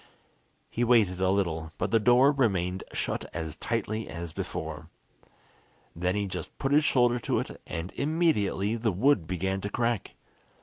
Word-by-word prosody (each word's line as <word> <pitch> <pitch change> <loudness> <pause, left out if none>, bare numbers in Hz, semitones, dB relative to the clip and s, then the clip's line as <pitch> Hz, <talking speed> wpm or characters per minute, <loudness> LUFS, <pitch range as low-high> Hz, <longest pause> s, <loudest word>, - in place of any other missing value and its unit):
He 120 - 0
waited 110 -7 +3
a 95 - +3
little, 80 -5 -1
but - - -2
the 115 - +5
door 125 +5 +5
remained 95 -9 0
shut - - -2
as 80 -2 -3
tightly 110 -1 -2
as 85 -1 -6
before. - - -5 1.1
Then 90 +3 0
he 105 0 0
just 90 -2 -6
put 135 - -1
his 150 +2 +5
shoulder 120 -4 +3
to - - -1
it, - - -4
and 85 +2 -4
immediately 140 - +1
the 110 -1 0
wood 100 - +2
began 95 +3 -1
to 100 - -3
crack. 120 0 -1
100 Hz, 160 wpm, -28 LUFS, 90-120 Hz, 1.1 s, the